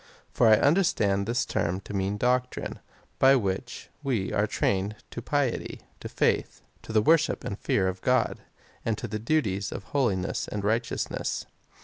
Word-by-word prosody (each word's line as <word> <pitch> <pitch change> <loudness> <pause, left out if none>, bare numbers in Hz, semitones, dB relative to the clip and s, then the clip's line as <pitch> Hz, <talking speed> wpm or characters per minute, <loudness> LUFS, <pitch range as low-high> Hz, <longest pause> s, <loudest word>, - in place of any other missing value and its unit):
For 120 - +3
I 110 - +8
understand 105 - +2
this 120 +1 0
term 90 +3 -1
to 105 - -9
mean 100 +1 -1
doctrine, 125 +2 -1 0.4
by 135 +1 +7
which 105 +1 -3
we 120 -9 -1
are 105 0 +2
trained 100 +1 0 0.2
to 120 - -5
piety, 140 0 -1 0.2
to - - -7
faith, - - 0 0.2
to - - -9
the 110 -1 +3
worshij) 160 +4 +3
and 100 - -5
fear 95 -2 +1
of 95 0 -3
God, 125 -2 +1 0.4
and 115 -2 -1
the 110 0 -4
duties 105 -7 0
of - - -6
holiness 105 -10 0
and 105 -1 -4
righteousness. 115 +3 -1
110 Hz, 155 wpm, -27 LUFS, 100-125 Hz, 0.4 s, I